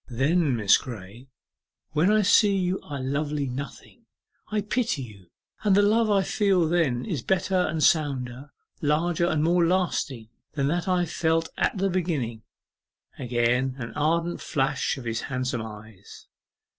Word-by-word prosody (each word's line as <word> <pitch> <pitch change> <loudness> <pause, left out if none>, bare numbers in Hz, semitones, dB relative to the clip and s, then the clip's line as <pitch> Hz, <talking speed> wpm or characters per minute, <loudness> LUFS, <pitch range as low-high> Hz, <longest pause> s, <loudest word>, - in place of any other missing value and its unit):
Then, 140 +3 +1
Miss 105 -4 +4
Graye, 115 +1 -10 0.6
when 160 +6 +3
I 215 0 +4
see 200 0 +4
you 185 0 0
are 145 - -7
a 130 - -5
Lovely 145 +2 -1
Nothing, 140 - -8 0.4
I 215 -1 -1
pity 210 - -1
you, 100 -6 -13 0.3
and 205 -3 +3
the 205 - +5
love 220 +2 +3
I 200 -2 +3
feel 195 -6 +2
then 155 -8 +1
is 165 - -3
better 190 +5 0
and 155 -1 -1
sounder, 135 -3 +1 0.3
larger 160 +3 +1
and 155 -3 +1
more 175 +2 +3
lasting 165 -10 -1 0.2
than 140 -1 0
that 175 +3 -1
I 180 -1 +2
felt 165 0 0
at - - 0
the 195 +1 +1
beginning.' 150 -11 -2 0.8
Again 125 +1 0
an 115 -3 -6
ardent 170 +3 0
flash 140 0 -1
of 130 - -9
his 115 0 -2
handsome 130 -2 -2
eyes. 105 -2 -11
150 Hz, 155 wpm, -25 LUFS, 125-180 Hz, 0.8 s, the